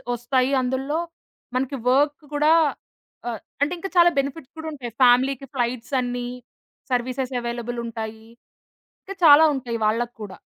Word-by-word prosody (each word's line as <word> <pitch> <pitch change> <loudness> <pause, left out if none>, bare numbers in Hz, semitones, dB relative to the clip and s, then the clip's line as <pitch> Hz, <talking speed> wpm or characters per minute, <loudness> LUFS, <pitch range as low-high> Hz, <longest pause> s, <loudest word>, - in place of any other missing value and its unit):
ఒస్తాయి 255 +2 0
అందులో 265 +5 -1 0.6
మనకి 265 +2 -1 0.2
వర్క్ 290 +3 +2
కూడా 300 +2 +3 0.8
ఆహ్, 225 -3 -5 0.2
అంటే 295 +5 +2
ఇంకా 390 - -5
చాలా 345 0 +8
బెనిఫిట్స్ 275 0 -4
కూడా 320 0 -6
ఉంటాయి. 245 -5 -7
ఫ్యామిలీకి 260 +2 +4
ఫ్లైట్స్ 240 +1 -2
అన్నీ 245 0 -3 0.6
సర్వీసెస్ 255 +1 -1
అవైలబుల్ 240 0 -4
ఉంటాయి. 220 -1 -6 0.8
ఇంకా 390 - -8
చాలా 295 +1 +9
ఉంటాయి 240 -3 -3
వాళ్ళకు 235 +2 0
కూడా. 195 -3 -8
255 Hz, 130 wpm, -23 LUFS, 240-280 Hz, 0.8 s, చాలా